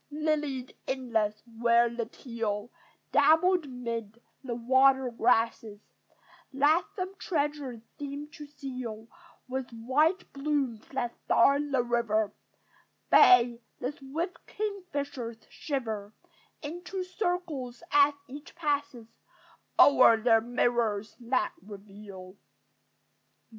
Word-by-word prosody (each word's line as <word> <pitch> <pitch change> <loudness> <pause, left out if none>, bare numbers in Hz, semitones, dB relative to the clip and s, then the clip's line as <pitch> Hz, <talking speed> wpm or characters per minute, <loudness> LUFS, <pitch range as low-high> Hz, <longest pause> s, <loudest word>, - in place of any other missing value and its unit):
Lilied 295 -4 -2
inlets, 225 -5 -1
where 235 0 +3
the 235 -1 -4
teal 230 -3 -4 0.4
Dabble 360 +4 +5
'mid 235 -4 -5 0.2
the 245 -3 -4
water 260 +2 +3
grasses, 225 -2 +1 0.7
That 290 +6 +3
some 375 0 -4
treasure 290 - -2 0.2
seem 285 +1 -5
to 300 -1 -11
seal 255 -6 -7 0.4
With 260 0 -4
white 285 +11 0
blooms 275 -6 -2
that 240 -3 -3
star 275 +4 +4
the 275 -4 0
river: 225 -3 0 0.8
Bays, 240 -1 +7 0.2
the 250 +2 -2
swift 320 +6 -5
kingfishers 285 - -4
shiver 220 -8 -4 0.5
Into 355 +5 -5
circles 355 - -3
as 290 0 +5
each 285 +4 -11
passes 290 -7 -2 0.7
O'er 255 -5 +7
their 225 0 +4
mirrors 235 -3 0
that 255 +8 0
reveal. 200 -2 -11
255 Hz, 95 wpm, -29 LUFS, 230-290 Hz, 0.8 s, Bays